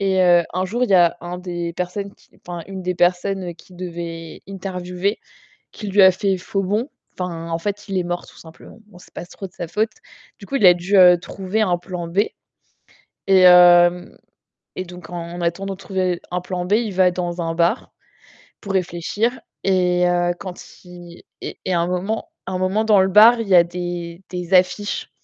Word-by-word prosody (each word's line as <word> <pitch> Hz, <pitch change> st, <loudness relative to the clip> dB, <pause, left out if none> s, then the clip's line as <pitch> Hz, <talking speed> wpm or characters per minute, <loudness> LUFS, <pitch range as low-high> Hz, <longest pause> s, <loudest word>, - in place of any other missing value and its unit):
et 190 Hz, -1 st, +1 dB
heu, 175 Hz, -1 st, +5 dB
un 185 Hz, +2 st, -1 dB
jour, 235 Hz, +7 st, -1 dB
il 235 Hz, -, -5 dB
y -, -, +5 dB
a 175 Hz, -2 st, +4 dB
un 175 Hz, +1 st, -6 dB
des 175 Hz, -2 st, -5 dB
personnes 180 Hz, +3 st, -4 dB
qui -, -, -27 dB, 0.2 s
enfin, 175 Hz, -1 st, -6 dB
une 190 Hz, -1 st, -7 dB
des 180 Hz, 0 st, -2 dB
personnes 180 Hz, +1 st, 0 dB
qui 180 Hz, -, -18 dB
devait 170 Hz, -2 st, -7 dB
interviewer 185 Hz, 0 st, -3 dB, 0.5 s
qui 210 Hz, -, -8 dB
lui 200 Hz, +1 st, +3 dB
a 190 Hz, 0 st, +8 dB
fait 190 Hz, +1 st, 0 dB
faux 195 Hz, +2 st, -3 dB
bond, 210 Hz, +8 st, -1 dB, 0.3 s
enfin, 170 Hz, -2 st, -5 dB
en 165 Hz, -, -1 dB
fait, 205 Hz, +4 st, -4 dB
il 195 Hz, -1 st, -2 dB
est 180 Hz, -, 0 dB
mort 175 Hz, 0 st, -4 dB
tout -, -, -18 dB
simplement. 165 Hz, +7 st, -15 dB
Bon, 205 Hz, -4 st, -17 dB
c'est 180 Hz, -, -18 dB
pas -, -, -7 dB
trop 195 Hz, -, -10 dB
de -, -, -24 dB
sa 170 Hz, -, -6 dB
faute, 215 Hz, +5 st, 0 dB, 0.5 s
du 200 Hz, -, -11 dB
coup, 275 Hz, -, -5 dB
il 215 Hz, -, +3 dB
a 180 Hz, -, +9 dB
dû, 180 Hz, +3 st, 0 dB
heu, 180 Hz, -1 st, +8 dB
trouver 195 Hz, +4 st, -3 dB
un 180 Hz, -5 st, +2 dB
plan 175 Hz, -1 st, -6 dB
B 170 Hz, +4 st, -1 dB, 1.1 s
et 190 Hz, -1 st, +5 dB
hem, 175 Hz, 0 st, +6 dB, 0.6 s
et 185 Hz, -, -4 dB
donc 180 Hz, -2 st, -12 dB
en 175 Hz, 0 st, -6 dB
attendant 195 Hz, +3 st, -2 dB
de -, -, -16 dB
trouver 185 Hz, -2 st, -2 dB
un 180 Hz, 0 st, -2 dB
plan 180 Hz, 0 st, -4 dB
B, 180 Hz, -, -4 dB
il 220 Hz, -1 st, +1 dB
va 185 Hz, 0 st, +4 dB
dans 175 Hz, -1 st, -4 dB
un 165 Hz, 0 st, -2 dB
bar 170 Hz, +7 st, 0 dB, 0.7 s
pour 200 Hz, -3 st, -5 dB
réfléchir 190 Hz, +6 st, -1 dB, 0.2 s
et 180 Hz, -2 st, +2 dB
heu, 175 Hz, 0 st, +1 dB
quand 185 Hz, -2 st, -8 dB, 0.2 s
il 175 Hz, -1 st, -13 dB, 0.2 s
et -, -, -7 dB
et 185 Hz, -, 0 dB
à 170 Hz, -, +2 dB
un 170 Hz, -, 0 dB
moment 185 Hz, +5 st, -2 dB, 0.2 s
à -, -, -5 dB
un 185 Hz, -, -2 dB
moment 190 Hz, +4 st, +1 dB
dans 215 Hz, -3 st, +4 dB
le 190 Hz, -, +4 dB
bar, 220 Hz, +5 st, +7 dB
il 225 Hz, -, -3 dB
y 190 Hz, -, +4 dB
a 175 Hz, -, +8 dB
des 175 Hz, 0 st, -6 dB
des 180 Hz, 0 st, -5 dB
affiches 185 Hz, +3 st, +1 dB
180 Hz, 210 wpm, -20 LUFS, 175-195 Hz, 1.1 s, a